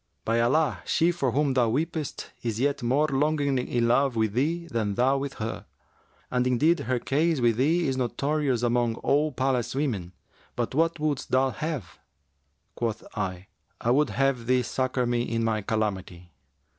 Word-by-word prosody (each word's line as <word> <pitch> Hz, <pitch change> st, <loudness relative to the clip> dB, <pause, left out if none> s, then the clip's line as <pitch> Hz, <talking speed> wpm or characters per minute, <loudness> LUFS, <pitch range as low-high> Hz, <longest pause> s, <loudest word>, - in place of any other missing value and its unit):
By 115 Hz, +1 st, +1 dB
Allah, 155 Hz, +7 st, +2 dB
she 170 Hz, +1 st, +2 dB
for 140 Hz, -8 st, -1 dB
whom 140 Hz, +2 st, +1 dB
thou 125 Hz, -3 st, +3 dB
weepest 155 Hz, +4 st, -3 dB
is 115 Hz, -2 st, -3 dB
yet 140 Hz, +2 st, 0 dB
more 135 Hz, +6 st, +2 dB
longingly 140 Hz, -2 st, 0 dB
in 120 Hz, -1 st, +1 dB
love 135 Hz, +1 st, +2 dB
with 110 Hz, -2 st, +1 dB
thee 160 Hz, +8 st, 0 dB
than 110 Hz, -10 st, -2 dB
thou 135 Hz, +4 st, +2 dB
with 140 Hz, 0 st, -4 dB
her! 110 Hz, +1 st, -5 dB, 0.6 s
And 125 Hz, 0 st, +1 dB
indeed 150 Hz, +7 st, +3 dB
her 125 Hz, +2 st, -1 dB
case 155 Hz, +5 st, +1 dB
with 120 Hz, -2 st, +2 dB
thee 160 Hz, +6 st, +2 dB
is 130 Hz, -1 st, -1 dB
notorious 135 Hz, 0 st, 0 dB
among 120 Hz, -1 st, +1 dB
all 150 Hz, +5 st, +1 dB
the 140 Hz, -, -16 dB
palace 130 Hz, -2 st, 0 dB
women. 105 Hz, -, -2 dB, 0.4 s
But 120 Hz, 0 st, -2 dB
what 165 Hz, +3 st, +1 dB
wouldst 150 Hz, -3 st, -1 dB
thou 130 Hz, +1 st, +2 dB
have?' 150 Hz, -, -5 dB, 0.7 s
Quoth 115 Hz, -2 st, -3 dB
I, 95 Hz, -1 st, -3 dB, 0.3 s
'I 120 Hz, -, +1 dB
would 145 Hz, +2 st, +3 dB
have 135 Hz, -4 st, 0 dB
thee 125 Hz, 0 st, +3 dB
succour 130 Hz, +1 st, -1 dB
me 120 Hz, 0 st, 0 dB
in 115 Hz, -1 st, -1 dB
my 110 Hz, -1 st, 0 dB
calamity.' 95 Hz, -5 st, -3 dB
130 Hz, 170 wpm, -26 LUFS, 115-145 Hz, 0.7 s, thou